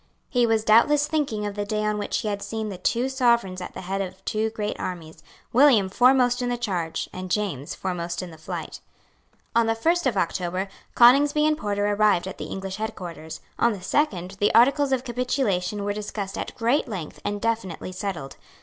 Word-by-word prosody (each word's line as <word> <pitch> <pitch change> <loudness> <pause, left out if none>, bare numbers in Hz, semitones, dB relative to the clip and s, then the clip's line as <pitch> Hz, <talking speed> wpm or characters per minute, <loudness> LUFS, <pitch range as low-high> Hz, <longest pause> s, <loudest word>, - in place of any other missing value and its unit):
He 245 -2 +2
was 225 -1 +2
doubtless 290 +7 +5
thinking 280 -10 -1
of 205 - -3
the 205 0 -3
day 215 +1 -2
on 210 0 0
which 205 - -2
he - - -4
had 200 -1 -2
seen 220 0 -4
the 190 -3 -7
two 240 +6 +1
Sovereigns 235 -8 +1
at - - -7
the - - -6
head 195 +2 -2
of 190 0 -7
two 220 0 0
great 215 -1 -3
armies, 165 -3 -6 0.3
William 240 -7 +5
foremost 250 +3 +4
in 245 - -1
the 245 - -1
charge, 180 -9 -2
and 185 0 -6
James 175 -9 -2
foremost 175 -1 -3
in 180 - -8
the 160 - -12
flight. - - -6 0.8
On 230 -1 +4
the 225 - +2
first 335 +7 +1
of 230 -6 0
October, 185 +2 -1 0.3
Coningsby 285 +5 +6
and 310 0 +3
Porter 205 -5 -1
arrived 205 -3 +2
at 190 - -7
the - - -4
English 195 0 -5
headquarters. 175 -8 -6 0.2
On 235 -1 +3
the 195 - -8
second 195 - 0
the 205 - +3
articles 275 +4 +5
of 260 -2 +1
capitulation 235 -6 -1
were 205 0 -1
discussed 205 -1 -5
at - - -5
great 240 +6 +1
length 185 -9 -6
and 205 0 -2
definitely 210 -6 -2
settled. 180 -7 -5
210 Hz, 195 wpm, -25 LUFS, 190-240 Hz, 0.8 s, Coningsby